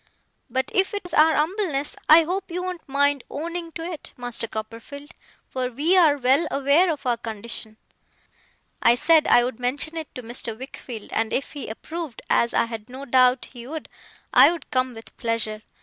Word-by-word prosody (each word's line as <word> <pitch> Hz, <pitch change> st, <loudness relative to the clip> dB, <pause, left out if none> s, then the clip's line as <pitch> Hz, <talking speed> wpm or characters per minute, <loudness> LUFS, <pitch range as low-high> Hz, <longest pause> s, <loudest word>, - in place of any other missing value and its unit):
But 260 Hz, 0 st, -1 dB
if 385 Hz, +2 st, +2 dB
it 405 Hz, -, -3 dB
is 355 Hz, -, -6 dB
our 315 Hz, +1 st, +5 dB
umbleness, 310 Hz, -3 st, 0 dB
I 320 Hz, +2 st, +9 dB
hope 375 Hz, +4 st, -3 dB
you 360 Hz, +1 st, -3 dB
won't 360 Hz, -5 st, -6 dB
mind 285 Hz, 0 st, +2 dB
owning 335 Hz, +3 st, -5 dB
to 330 Hz, -, -6 dB
it, 335 Hz, -2 st, -7 dB
Master 245 Hz, -2 st, -3 dB
Copperfield; 230 Hz, +7 st, -8 dB, 0.4 s
for 255 Hz, -1 st, -2 dB
we 295 Hz, +9 st, +2 dB
are 320 Hz, -6 st, +5 dB
well 275 Hz, +5 st, +3 dB
aware 285 Hz, +6 st, +3 dB
of 290 Hz, -3 st, -6 dB
our 240 Hz, -2 st, +1 dB
condition.' 220 Hz, -1 st, -6 dB, 1.0 s
I 235 Hz, -, +6 dB
said 315 Hz, +4 st, +4 dB
I 240 Hz, -, +6 dB
would 245 Hz, -1 st, -3 dB
mention 285 Hz, +6 st, -2 dB
it 320 Hz, -2 st, -7 dB
to 250 Hz, -, -6 dB
Mr. 230 Hz, -1 st, -5 dB
Wickfield, 245 Hz, -3 st, -9 dB
and 225 Hz, -, 0 dB
if 260 Hz, -, -2 dB
he 285 Hz, -7 st, -6 dB
approved, 315 Hz, +3 st, -7 dB
as 235 Hz, -, +3 dB
I -, -, +2 dB
had 225 Hz, 0 st, -8 dB
no 265 Hz, +2 st, -8 dB
doubt 255 Hz, 0 st, +3 dB
he 240 Hz, -1 st, -9 dB
would, 315 Hz, +2 st, -6 dB, 0.4 s
I -, -, +8 dB
would 340 Hz, -5 st, -7 dB
come 255 Hz, -1 st, 0 dB
with 225 Hz, -, -12 dB
pleasure. 225 Hz, -2 st, -2 dB
275 Hz, 185 wpm, -24 LUFS, 240-320 Hz, 1.0 s, I